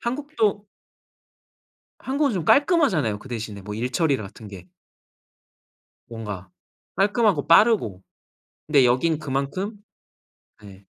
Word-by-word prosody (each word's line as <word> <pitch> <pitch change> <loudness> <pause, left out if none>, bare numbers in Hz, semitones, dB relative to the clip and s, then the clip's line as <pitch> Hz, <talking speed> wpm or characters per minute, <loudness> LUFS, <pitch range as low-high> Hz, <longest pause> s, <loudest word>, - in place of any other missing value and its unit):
한국도 235 -6 -2 1.3
한국은 275 +1 0
좀 175 -5 -3
깔끔하잖아요, 265 - +3
그 130 - -13
대신에 110 -4 -6
뭐 105 +2 -7
일처리 130 +6 0
같은 105 +1 -10
게. 95 -2 -12 1.4
뭔가 105 -5 -7 0.5
깔끔하고 200 - +1
빠르고 170 - +4 0.7
근데 145 -4 +4
여긴 130 +7 +2
그만큼 150 +9 -3 0.9
네. 100 -1 -14
145 Hz, 225 characters per minute, -23 LUFS, -, 1.4 s, 빠르고